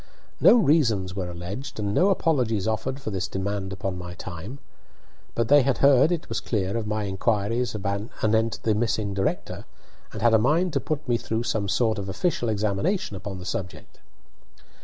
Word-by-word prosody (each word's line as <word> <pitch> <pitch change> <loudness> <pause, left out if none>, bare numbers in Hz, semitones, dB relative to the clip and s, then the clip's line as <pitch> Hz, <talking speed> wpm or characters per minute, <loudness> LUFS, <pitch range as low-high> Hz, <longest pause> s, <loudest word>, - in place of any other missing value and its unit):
No - - +7
reasons 115 - +2
were 90 -3 -3
alleged 90 +10 -6
and 100 -1 -1
no 185 - +4
apologies 125 - +1
offered 130 +5 -2
for 110 - -5
this 95 -1 -2
demand 95 0 -3
upon 95 -1 -4
my 90 0 -7
time, 95 +10 -7 0.8
but 115 -1 +1
they 145 +3 +7
had 135 0 +1
heard, 140 +3 +5
it 170 -2 -2
was - - -2
clear, 100 -3 -2
of 115 -2 -2
my 105 0 -1
inquiries 105 +4 0
anent 110 +2 -1
the 110 - +2
missing 105 -2 0
director, 95 0 -2 0.5
and 110 - -6
had 120 -1 +5
a 110 - +6
mind 160 +9 +2
to - - +2
put 150 -2 -3
me 120 -1 +2
through 115 0 -2
some 110 -3 -1
sort 110 0 +1
of 100 -1 -5
official 120 - -1
examination 105 - -1
upon 95 0 -6
the 90 - -9
subject. 95 -5 -6
110 Hz, 180 wpm, -25 LUFS, 100-125 Hz, 0.8 s, No